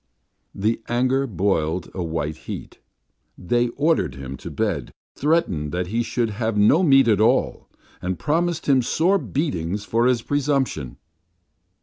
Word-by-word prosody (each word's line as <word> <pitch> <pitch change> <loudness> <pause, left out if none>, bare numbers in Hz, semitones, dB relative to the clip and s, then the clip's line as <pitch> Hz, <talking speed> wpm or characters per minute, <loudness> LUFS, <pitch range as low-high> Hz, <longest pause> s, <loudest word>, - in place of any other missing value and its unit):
The 110 +4 0
anger 130 +3 +1
boiled 90 -4 -1
a 95 - -4
white 80 -2 -2
heat. - - -7 0.6
They 120 +7 +1
ordered 145 - +1
him 70 0 -7
to - - -8
bed, - - -2 0.3
threatened 130 - 0
that 90 0 -1
he 115 - +2
should 115 -1 -1
have 110 0 -2
no 110 - +5
meat 135 -7 +5
at 105 -2 +3
all, 110 - +1 0.3
and 90 0 -2
promised 170 - 0
him 135 -2 +4
sore 175 +10 +2
beatings 100 - -2
for 115 +3 +2
his 125 -2 +1
presumption. 135 - -1
115 Hz, 140 wpm, -22 LUFS, 90-135 Hz, 0.6 s, no